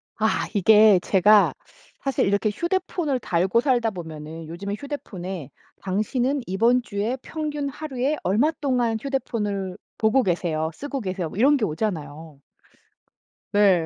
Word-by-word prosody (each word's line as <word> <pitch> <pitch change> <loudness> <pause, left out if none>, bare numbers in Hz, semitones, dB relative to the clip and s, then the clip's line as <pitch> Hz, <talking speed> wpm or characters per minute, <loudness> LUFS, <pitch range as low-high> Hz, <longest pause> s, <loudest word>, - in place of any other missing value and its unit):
아. 220 0 0
이게 210 0 +6
제가 205 +2 +5 0.5
사실 275 -1 0
이렇게 200 +2 +1
휴대폰을 340 - -1
달고 185 +4 +1
살다 245 -5 +2
보면은 160 -2 -8
요즘에 200 +5 -5
휴대폰에 190 - -6 0.3
당신은 245 +8 0
이번 230 +7 +3
주에 220 +3 -2
평균 295 -2 -3
하루에 275 0 -2
얼마 225 - +2
동안 245 -5 +1
휴대폰을 210 -8 -2 0.2
보고 225 +4 +3
계세요 165 -3 -1
쓰고 280 - -5
계세요 185 -4 -3
뭐 185 - -10
이런 280 +5 +5
게 225 - 0
오잖아요. 155 -5 -4 1.1
네. 195 -5 +4
210 Hz, 290 characters per minute, -24 LUFS, 185-265 Hz, 1.1 s, 이게